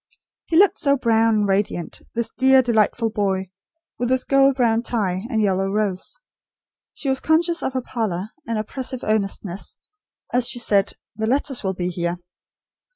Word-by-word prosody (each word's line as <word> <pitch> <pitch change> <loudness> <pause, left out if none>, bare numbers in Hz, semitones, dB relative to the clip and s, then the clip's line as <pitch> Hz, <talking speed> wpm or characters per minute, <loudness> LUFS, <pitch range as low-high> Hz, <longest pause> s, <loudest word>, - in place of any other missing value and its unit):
He 325 - +1
looked 395 +1 +5
so 280 -1 +3
brown 225 -2 +3
and 210 -1 +1
radiant, 195 -3 -1
this 235 0 -2
dear 265 0 +5
delightful 225 -1 +1
boy, 190 -3 -1 0.5
with 245 0 -1
his 260 0 +2
gold 275 0 +4
brown 230 -3 +2
tie, 200 -5 -2
and 220 -4 +1
yellow 195 -1 +1
rose. 200 -2 -2 0.8
She 285 - -5
was 265 0 +1
conscious 335 +2 +2
of 265 - -2
her 260 -1 -2
pallor, 215 -5 -3 0.2
and 230 -1 -1
oppressive 255 +4 -4
earnestness, 200 -3 -2 0.6
as 245 0 +3
she - - 0
said: 200 -4 +2 0.2
"The 220 +1 -2
letters 270 0 +1
will 190 -1 -1
be 180 0 -2
here." 175 0 -2
225 Hz, 160 wpm, -22 LUFS, 195-260 Hz, 0.8 s, looked